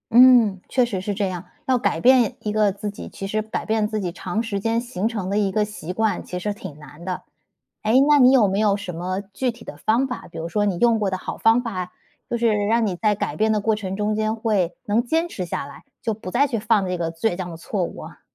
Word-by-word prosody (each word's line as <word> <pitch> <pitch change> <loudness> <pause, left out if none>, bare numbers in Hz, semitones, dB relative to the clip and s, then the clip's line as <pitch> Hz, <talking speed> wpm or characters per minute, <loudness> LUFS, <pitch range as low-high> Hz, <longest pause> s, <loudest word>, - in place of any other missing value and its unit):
嗯， 240 -5 +7
确 250 -2 +2
实 210 -6 -3
是 205 +2 -3
这 195 -1 -1
样。 180 -1 -6 0.2
要 260 -1 +3
改 - - 0
变 250 -3 +5
一 210 - -2
个 210 -2 +2
自 205 +1 -5
己， 200 - -9
其 195 - -6
实 215 +2 -1
改 220 0 -4
变 220 -1 +1
自 215 -1 -3
己 180 -3 -2
长 185 +6 -3
时 205 -3 -2
间 225 +3 0
形 225 -4 -2
成 210 -5 -3
的 200 - 0
一 200 -2 +1
个 215 - +2
习 210 -4 -6
惯， 215 -1 0
其 180 - -5
实 205 +3 -2
挺 190 -7 -9
难 150 +2 -13
的。 185 -1 -4 0.6
诶， 215 +1 +1
那 290 +1 +5
你 255 -1 +7
有 235 -6 +5
没 195 +2 0
有 210 -2 +3
什 200 -3 -6
么， 185 +3 -3
具 210 +6 -2
体 230 0 -15
的 - - -9
方 235 +5 +2
法， 250 - -6
比 - - -10
如 165 +1 -4
说 205 +4 +1
你 195 -4 0
用 235 -2 +4
过 205 -2 +1
的 190 - -2
好 - - -6
方 225 +2 +4
法， 185 -6 -4 0.4
就 240 - 0
是， 235 0 +2 0.2
让 230 +1 +3
你 190 -4 -1
在 210 +2 +2
改 - - -3
变 220 +1 +2
的 210 - 0
过 220 +2 +2
程 195 -3 -4
中 210 +1 0
间 215 +1 0
会 210 -6 0
能 215 +1 +2
坚 325 +7 0
持 185 - -4
下 170 - -3
来， 140 - -12 0.2
就 225 - -1
不 205 -3 -8
再 270 +7 +3
去 235 -4 -2
犯 215 -2 +2
这 180 0 -2
个 165 -1 -2
倔 175 +2 -1
强 180 -2 -4
的 165 - -7
错 185 +3 -2
误 - - -8
啊。 - - -12
210 Hz, 290 characters per minute, -23 LUFS, 190-230 Hz, 0.6 s, 嗯